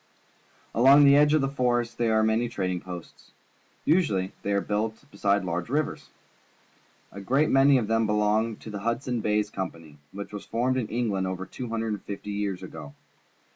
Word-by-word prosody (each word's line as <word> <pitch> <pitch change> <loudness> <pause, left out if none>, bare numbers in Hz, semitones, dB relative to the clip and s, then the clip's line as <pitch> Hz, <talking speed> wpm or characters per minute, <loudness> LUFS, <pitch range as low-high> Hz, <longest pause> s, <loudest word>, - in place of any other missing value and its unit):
Along 135 +5 +7
the 140 0 +7
edge 150 +1 +5
of 155 - +3
the 135 - +1
forest 120 -3 -1
there 115 -2 +2
are 110 - +3
many 110 +2 +1
trading 90 -6 -2
posts. 90 -2 -10 0.6
Usually 105 - +2
they 100 - -2
are 100 - +2
built 110 +2 -2
beside 100 -1 +1
large 90 +3 -3
rivers. 150 +3 -2 1.0
A 100 - -9
great 135 +9 +2
many 135 +1 +5
of 120 - 0
them 115 0 +1
belong 105 +1 +1
to 110 - -10
the 100 - -5
Hudson's 115 +2 -2
Bay 105 0 +1
Company, 85 -7 -7
which 100 +1 -8
was 105 - -6
formed 125 +3 0
in 120 -4 -1
England 105 -5 -1
over 95 0 -4
two 125 +5 -7
hundred 115 0 -2
and 105 - -5
fifty 105 0 -7
years 100 -3 -3
ago. 75 -3 -9
110 Hz, 180 wpm, -26 LUFS, 100-125 Hz, 1.0 s, Along